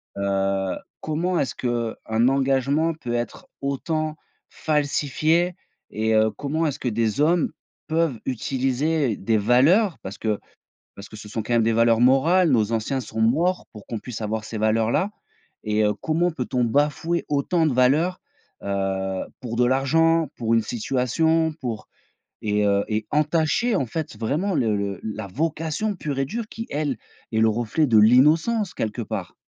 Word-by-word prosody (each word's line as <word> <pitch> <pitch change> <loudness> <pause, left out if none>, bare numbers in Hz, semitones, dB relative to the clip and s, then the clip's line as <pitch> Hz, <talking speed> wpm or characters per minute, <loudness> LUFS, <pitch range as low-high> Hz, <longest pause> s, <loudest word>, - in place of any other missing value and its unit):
heu, 95 -1 0 0.3
comment 165 +3 -1
est-ce 135 - -1
qu'un 115 -1 -1
engagement 135 +4 +2
peut 125 -6 -5
être 120 -2 -4
autant 155 +3 -2 0.3
falsifié 155 +3 0 0.3
et 110 +1 0
heu, 110 0 +3
comment 155 +3 -2
est-ce 145 -3 -2
que - - -3
des 115 +3 0
hommes 165 +1 +2 0.4
peuvent 160 -6 0
utiliser 135 +2 0
des 110 +2 +1
valeurs? 145 - +4
Parce 95 - -8
que 110 -2 -1 0.6
parce 100 0 -11
que - - -11
ce 105 - -10
sont 110 +2 -3
quand 115 +3 -3
même 115 -1 +4
des 115 0 +2
valeurs 115 0 +4
morales, 155 +7 +4
nos 110 -3 +2
anciens 115 +4 -1
sont 110 -1 -5
morts 165 +11 +2
pour 105 -2 -12
qu'on 115 - -4
puisse 115 0 -7
avoir 110 0 -2
ces 110 - -6
valeurs 110 +1 +2
là 190 - +1 0.5
et 105 0 +1
heu, 105 0 +2
comment 165 +3 +1
peut-on 125 -3 -1
bafouer 150 +7 0
autant 155 +4 +1
de 150 - +1
valeurs, 150 +9 +2 0.4
heu, 95 -1 -2 0.2
pour 115 -3 -5
de 125 - +3
l'argent, 160 +5 +3
pour 115 -1 -1
une 115 - +4
situation? 155 +8 0
Pour 115 -4 -4 0.5
et 105 -1 +1
heu, 100 0 +2
et 110 0 -1
entacher 155 +9 +1
en 135 - +1
fait 135 -2 -5
vraiment 155 - -1
le 110 -4 +1
le 100 -2 -3
la 110 -1 -5
vocation 160 - -2
pure 145 -6 -4
et 135 - +1
dure, 225 - -4
qui 225 +1 -7
elle 145 -4 -2 0.3
est 110 - 0
le 110 - +5
reflet 120 +7 0
de 115 - +4
l'innocence 155 - +4
quelque 110 +2 -3
part. 105 -5 -5
130 Hz, 165 wpm, -23 LUFS, 110-155 Hz, 0.6 s, le